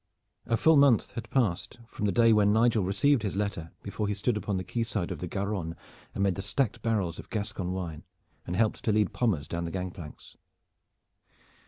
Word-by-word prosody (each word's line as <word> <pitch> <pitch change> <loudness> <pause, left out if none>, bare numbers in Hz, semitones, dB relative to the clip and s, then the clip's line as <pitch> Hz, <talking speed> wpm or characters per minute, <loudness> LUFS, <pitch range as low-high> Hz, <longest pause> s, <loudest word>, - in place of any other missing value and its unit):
A 115 - +2
full 160 +4 +5
month 140 -5 +5
has 115 - -6
passed 115 -6 0
from 105 - -3
the - - +2
day 115 +3 +5
when 105 -1 +4
Nigel 110 -1 +3
received 110 +8 +2
his 100 -3 -2
letter 100 -5 -2
before 105 - -3
he 105 - -1
stood 110 +3 0
upon 105 -2 -2
the 95 - -2
quay 115 +6 -3
side 105 -6 -2
of - - -4
the 90 - -4
Garonne 95 -3 -3 0.4
amid 100 -1 +2
the 95 - -5
stacked 105 +4 -1
barrels 100 -7 -1
of - - -10
Gascon 100 -4 -3
wine 85 -5 -5 0.4
and 90 - -2
helped 110 +2 +1
to 110 - +3
lead 105 -2 +2
Pommers 95 - 0
down 85 0 -3
the - - -3
gang 90 +1 -3
planks. 85 -5 -11
100 Hz, 200 wpm, -29 LUFS, 90-115 Hz, 0.4 s, full